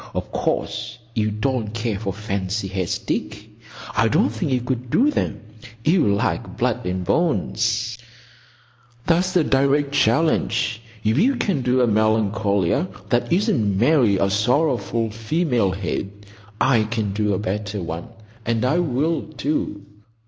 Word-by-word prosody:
—Of - - -3
course 115 -1 -2 0.2
you 110 -1 +1
don't 110 0 -2
care 115 -3 -2
for 100 -3 -2
fancy 100 0 -3
heads, 95 -2 -2
Dick. - - -4 0.5
I - - +3
don't - - +2
think 115 +4 -2
you 130 - +2
could 125 0 -3
do 275 - +3
them. - - -2 0.5
You 165 - +4
like 100 0 -1
blood - - 0
and 90 0 -2
bones." 115 - 0 1.1
"That's 180 +2 +2
a 175 - +5
direct 140 +1 +2
challenge. 135 -3 +1 0.2
If 110 +6 +2
you 260 +8 +3
can 190 - 0
do 125 +1 +2
a 125 - +4
Melancolia 110 - +1 0.2
that 120 +4 +1
isn't 170 - +2
merely 120 -4 +4
a 95 0 +1
sorrowful 115 0 +1
female 115 - 0
head, 100 +2 -4 0.3
I 125 -4 +3
can 110 -3 -2
do 105 -1 +1
a - - -1
better 105 +1 -3
one; 85 0 -5 0.4
and 115 +1 0
I 155 +7 +2
will, 160 +1 0 0.2
too. 120 -7 -2
115 Hz, 140 wpm, -22 LUFS, 105-140 Hz, 1.1 s, a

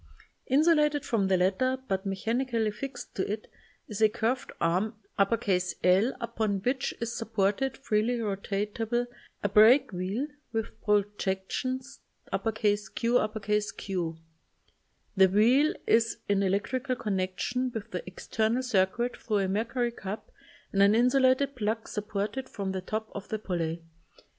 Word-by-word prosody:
Insulated 300 0 +3
from 205 -5 +1
the 190 -1 +3
latter, 200 +9 +2
but 190 +1 -1
mechanically 225 +3 0
fixt 275 +6 -7
to 195 - -2
it, 215 +1 -4 0.4
is 210 0 -5
a 215 - +6
curved 235 +3 -1
arm 185 +7 +1 0.2
L 195 0 +2
upon 220 -3 -1
which 255 +2 0
is 235 0 -3
sup 225 -1 -6
ported, 210 +7 +1
freely 230 -1 +1
rotatable, 210 +3 -1 0.4
a - - +2
break 230 +5 +6
wheel 190 +8 -2 0.3
with 225 -1 -2
projections 210 +6 -1 0.3
QQ. 210 -4 0 1.0
The 190 -1 +6
wheel 245 +10 +4
is 230 0 +3
in 200 -1 +2
electrical 235 +7 0
connection 210 +5 -1
with 225 -3 -6
the 180 - -3
external 220 +6 -1
circuit 235 +1 +1
thru 215 -3 -1
a 195 -1 +1
mercury 235 +5 0
cup 205 -2 -7 0.4
and 195 - +3
an 200 +2 +6
insulated 260 +3 +3
plug 220 -1 -2
sup 210 -1 -5
ported 215 +6 -3
from 195 -2 -3
the 190 -1 -3
top 215 +3 -4
of 200 - -7
the 220 - -1
pulley. 170 -5 -3
215 Hz, 130 wpm, -29 LUFS, 195-245 Hz, 1.0 s, a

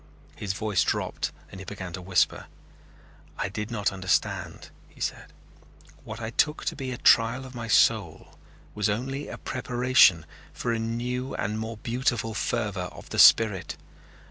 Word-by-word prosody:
His 100 -2 -3
voice 105 -2 0
dropped - - -2 0.2
and 95 - -9
he - - -7
began 95 -3 -7
to 90 - -6
whisper. 90 -1 +1 0.9
"I - - -2
did 105 +2 -5
not 105 -4 0
understand," 95 -1 -2 0.2
he - - -21
said. - - -4 0.7
"What 110 +1 -8
I 110 0 -5
took 150 +5 +1
to - - -1
be 135 -2 -5
a 125 - -4
trial 115 +4 +4
of 130 - -11
my 120 -2 -6
soul 110 -7 +2 0.4
was 105 0 0
only 135 +7 -3
a - - -7
preparation 125 -9 +3 0.3
for 120 - -2
a 115 - -1
new 125 +3 -3
and 105 +2 -2
more 110 0 -5
beautiful 120 -1 -1
fervor 105 -6 -2
of - - -13
the - - -2
spirit. 105 -5 +5
110 Hz, 160 wpm, -26 LUFS, 100-120 Hz, 0.9 s, spirit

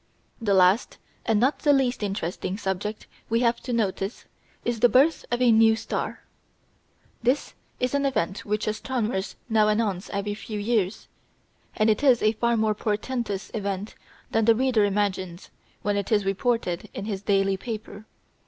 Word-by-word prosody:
The 205 -3 +2
last, 185 +5 +3 0.3
and 220 -3 +3
not 265 +6 +2
the 295 - +3
least 265 -4 +2
interesting, 195 -1 -3
subject 210 +1 -3 0.2
we 230 +1 +2
have 235 -1 +2
to 250 - -5
notice 205 -2 -2 0.4
is 240 -1 -1
the 245 - +5
birth 285 +7 +3
of 240 +1 0
a 240 - +6
"new 225 0 +6
star." 220 - -4 1.0
This 250 +5 0 0.3
is 250 +1 0
an 280 0 +2
event 190 -7 -1
which 210 0 -1
astronomers 215 -2 -2
now 220 -2 +3
announce 210 -3 0
every 200 +1 -2
few 215 +1 -6
years; 205 -2 -1 0.7
and 215 - +2
it 215 +2 +2
is 260 -5 +4
a 215 - +5
far 235 +1 +1
more 220 -1 +2
portentous 210 -1 -3
event 200 -1 -3 0.4
than 225 -1 +2
the 230 0 +6
reader 245 -3 +3
imagines 190 -3 -2 0.3
when 205 0 +1
it 200 +1 -2
is 205 -2 +3
reported 195 -2 -1
in 200 - -4
his 200 -3 -3
daily 195 -1 +2
paper. 215 0 -7
215 Hz, 160 wpm, -25 LUFS, 200-235 Hz, 1.0 s, a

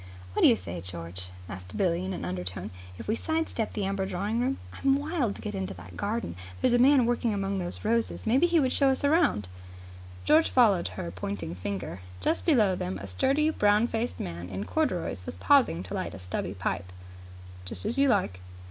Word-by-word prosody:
"What - - 0
do - - +8
you - - +6
say, 90 -3 -6
George," 90 +1 -6 0.2
asked 90 +1 -8
Billie 175 -2 +1
in 190 - -3
an 185 - -4
undertone, 90 +2 -4 0.3
"if - - -8
we 215 - +1
side 320 +5 -1
step 220 -2 -3
the 205 - -1
Amber 195 0 -1
Drawing 205 +6 -1
Room? 260 +2 0 0.2
I'm 275 0 +2
wild 285 - -1
to - - -10
get 210 - -4
into 190 -1 -3
that - - -11
garden. 210 - -2 0.2
There's 235 - +3
a 245 - +4
man 265 0 +6
working 235 -2 +1
among 195 0 -1
those 175 +2 -5
roses. 230 +1 0
Maybe 260 +10 +4
he 340 -1 +3
would 260 -3 +2
show 275 -2 +4
us 265 +1 0
round." 285 - +3 0.8
George 315 +2 +5
followed 210 - +4
her 85 - -4
pointing 90 -1 -4
finger. 95 0 -5 0.2
Just 95 - 0
below 220 - +5
them 95 - -3
a 100 - -7
sturdy, 275 - +2
brown 210 -4 +3
faced 230 +1 -2
man 85 +1 -5
in 95 +1 -4
corduroys 175 - -1
was - - -3
pausing 90 -2 +4
to 90 - -7
light - - -3
a - - -9
stubby 90 +1 -4
pipe. 90 0 -3 0.7
"Just 90 - -4
as 235 +6 0
you 280 0 +5
like." 145 - +1
195 Hz, 205 wpm, -28 LUFS, -, 0.8 s, do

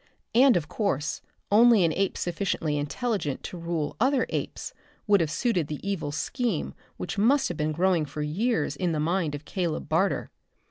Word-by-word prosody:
And 250 -3 +6
of 155 -4 -3
course 165 - -1 0.3
only 225 -1 +6
an 160 - +1
ape 195 +2 0
sufficiently 170 -4 -1
intelligent 150 - -2
to 180 - -6
rule 165 -3 -3
other 260 +3 +3
apes - - -4 0.3
would 200 -3 +4
have 160 - 0
suited 175 - 0
the 150 -1 -5
evil 185 -7 -2
scheme 200 - -2 0.2
which 200 +3 -4
must 265 +6 +3
have 175 - -4
been 150 +1 0
growing 175 0 +2
for 150 +1 -5
years 215 +11 0
in 180 -3 -1
the 155 - -1
mind 165 -1 0
of 145 +1 -9
Caleb 175 -4 -3
Barter. 185 +5 +1
175 Hz, 175 wpm, -27 LUFS, 155-210 Hz, 0.3 s, And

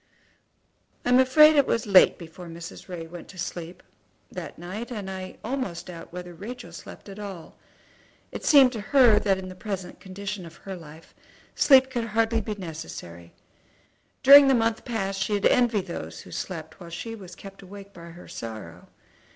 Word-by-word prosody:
I - - 0
am 250 +1 +6
afraid 305 +4 +7
it 285 -2 +4
was 230 - 0
late 195 -3 +6
before 170 +1 -11
Mrs. 165 +2 -10
Ray 170 -2 -6
went 170 +1 -10
to 185 - -14
sleep 175 0 -6 0.5
that 170 -5 -7
night, 190 +8 -6
and 205 -5 -5
I 185 0 -7
almost 245 -8 -3
doubt 170 -2 -10
whether 180 0 -8
Rachel 235 +8 -8
slept - - -11
at 200 +1 -9
all. 195 -5 -8 0.8
It - - -7
seemed 275 -4 +7
to 225 -4 -5
her 240 -1 +5
that 195 -2 +1
in 190 0 -7
the 185 - -8
present 190 -1 -6
condition 200 0 -6
of 165 -1 -11
her 190 +2 -8
life 160 -1 -13 0.4
sleep 265 -2 +5
could 240 -3 -2
hardly 225 +1 +1
be 215 -1 -4
necessary. 155 - -8 0.9
During 280 +1 +10
the 270 - +5
last - - +3
month 225 0 0
past 195 -5 -2
she 205 +2 0
had 200 - -1
envied 230 -6 +3
those 80 - -7
who 90 - -14
slept 160 - -6
while 175 -2 -10
she 225 +7 -6
was 185 -5 -10
kept 195 +1 -12
awake 200 +1 -12
by 170 -1 -11
her 170 +1 -12
sorrow. 105 -7 -8
195 Hz, 185 wpm, -26 LUFS, 170-225 Hz, 0.9 s, During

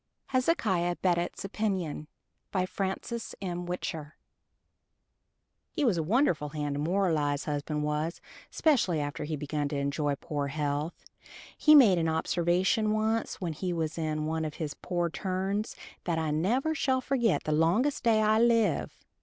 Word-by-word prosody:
HEZEKIAH 210 - +1
BEDOTT'S 175 +1 0
OPINION 190 -7 -2 0.4
BY 185 -2 +1
FRANCES 195 +5 -4
M. 175 -2 -4
WHICHER 160 -4 -4 1.6
He 300 - 0
was 225 -7 +3
a - - +1
wonderful 175 - +1
hand 145 -1 -3
to 140 - -3
moralize, 155 -4 +1
husband 150 0 -2
was, 150 +3 -2 0.3
'specially 240 - +2
after 145 +1 -3
he 155 +1 -2
begun 150 0 -2
to 145 - -4
enjoy 140 +1 0
poor 145 0 -3
health. 145 +2 -3 0.5
He 305 -1 +6
made 215 -11 +7
an 165 -1 +1
observation 175 +6 +1
once 220 +1 0
when 175 -5 -2
he 180 +4 -3
was 160 -1 -2
in 155 -2 -2
one 160 +1 -1
of 155 -1 -4
his 150 -3 -4
poor 175 -2 -2
turns, 195 +3 -2 0.3
that 170 -2 0
I 160 -1 0
never 235 - +1
shall 260 -4 +1
forget 245 -5 +1
the 155 - -2
longest 175 - +2
day 220 -2 +4
I 215 +1 +4
live. 230 -2 +2
175 Hz, 150 wpm, -29 LUFS, 155-215 Hz, 1.6 s, made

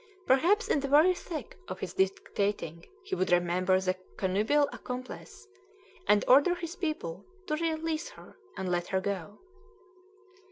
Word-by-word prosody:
Perhaps 350 - +3
in - - +2
the 280 - -2
very 305 +6 +6
thick 325 -7 -7
of 185 +1 -6
his 180 -2 -5
dictating 190 -3 -1 0.2
he 390 0 -7
would 185 - 0
remember 180 +1 +3
the 185 -1 0 0.2
connubial 215 +10 +2
accomplice, 255 +9 -8 0.6
and 210 0 +4
order 285 +7 +6
his 340 0 -6
people 305 - -3 0.2
to 305 - -2
"release 325 0 -1
her, - - -15 0.2
and 185 -1 -2
let 175 0 0
her 190 - +1
go." 200 0 -4
210 Hz, 145 wpm, -30 LUFS, 185-315 Hz, 0.6 s, very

